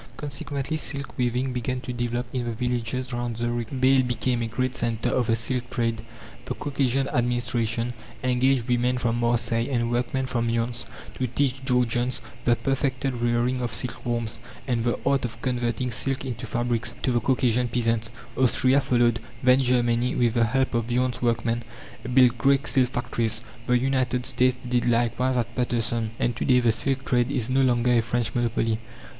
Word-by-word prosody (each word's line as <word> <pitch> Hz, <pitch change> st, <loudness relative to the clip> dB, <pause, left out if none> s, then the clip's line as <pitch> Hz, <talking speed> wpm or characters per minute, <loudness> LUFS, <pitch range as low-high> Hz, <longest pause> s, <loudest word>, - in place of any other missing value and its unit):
Consequently, 140 Hz, +1 st, -4 dB
silk 140 Hz, -5 st, -4 dB
weaving 125 Hz, +1 st, 0 dB
began 125 Hz, +1 st, -2 dB
to 125 Hz, -, -5 dB
develop 120 Hz, 0 st, -2 dB
in 125 Hz, -2 st, -1 dB
the 120 Hz, -, -2 dB
villages 125 Hz, +2 st, -2 dB
round 120 Hz, -1 st, -3 dB
Zurich. 120 Hz, -1 st, -2 dB
Bâle 130 Hz, -1 st, +3 dB
became 120 Hz, +1 st, 0 dB
a 115 Hz, -, -1 dB
great 130 Hz, +3 st, -1 dB
centre 120 Hz, -1 st, -1 dB
of 120 Hz, -, +1 dB
the 115 Hz, -, +3 dB
silk 125 Hz, +2 st, -2 dB
trade. 115 Hz, -3 st, -1 dB, 0.4 s
The -, -, -3 dB
Caucasian 135 Hz, -2 st, 0 dB
Administration 120 Hz, -1 st, 0 dB, 0.3 s
engaged 125 Hz, -1 st, +2 dB
women 125 Hz, +1 st, +1 dB
from 120 Hz, -1 st, 0 dB
Marseilles 120 Hz, 0 st, +1 dB
and 120 Hz, -3 st, 0 dB
workmen 125 Hz, +2 st, 0 dB
from 120 Hz, -2 st, -1 dB
Lyons 115 Hz, +1 st, -1 dB, 0.3 s
to 130 Hz, -, +1 dB
teach 135 Hz, +1 st, -1 dB
Georgians 125 Hz, -1 st, +1 dB, 0.3 s
the 120 Hz, -, +4 dB
perfected 135 Hz, +2 st, -1 dB
rearing 120 Hz, +1 st, 0 dB
of 120 Hz, -2 st, -2 dB
silk 125 Hz, -, -4 dB
worms, 115 Hz, -2 st, -2 dB, 0.3 s
and 120 Hz, -3 st, 0 dB
the 120 Hz, 0 st, 0 dB
art 140 Hz, 0 st, +2 dB
of 115 Hz, -2 st, -4 dB
converting 125 Hz, -1 st, -1 dB
silk 135 Hz, +3 st, -1 dB
into 125 Hz, -1 st, -5 dB
fabrics 120 Hz, 0 st, -1 dB
to 130 Hz, -, +2 dB
the 120 Hz, -, +2 dB
Caucasian 125 Hz, 0 st, +1 dB
peasants. 115 Hz, -1 st, 0 dB, 0.3 s
Austria 130 Hz, +1 st, +3 dB
followed. 120 Hz, -3 st, +2 dB, 0.2 s
Then 125 Hz, +1 st, +6 dB
Germany, 125 Hz, -1 st, +2 dB
with 120 Hz, -2 st, +2 dB
the 120 Hz, -1 st, +3 dB
help 130 Hz, +3 st, 0 dB
of 115 Hz, 0 st, -1 dB
Lyons 125 Hz, -2 st, 0 dB
workmen, 115 Hz, 0 st, 0 dB, 0.5 s
built 125 Hz, -2 st, +5 dB
great 135 Hz, +2 st, +3 dB
silk 130 Hz, -2 st, +2 dB
factories. 115 Hz, -3 st, -2 dB, 0.3 s
The 125 Hz, -, +4 dB
United 125 Hz, -1 st, 0 dB
States 125 Hz, 0 st, +3 dB
did 125 Hz, 0 st, +1 dB
likewise 120 Hz, +2 st, +1 dB
at 120 Hz, -1 st, -2 dB
Paterson. 115 Hz, -2 st, 0 dB
And 120 Hz, -, 0 dB
to -, -, -2 dB
day 125 Hz, -1 st, +5 dB
the 120 Hz, -2 st, +3 dB
silk 135 Hz, +4 st, -1 dB
trade 120 Hz, -1 st, +2 dB
is 125 Hz, +1 st, -1 dB
no 135 Hz, +1 st, +3 dB
longer 125 Hz, -1 st, +3 dB
a 120 Hz, -1 st, +4 dB
French 115 Hz, 0 st, -1 dB
monopoly. 115 Hz, -2 st, 0 dB
120 Hz, 175 wpm, -25 LUFS, 115-130 Hz, 0.5 s, Then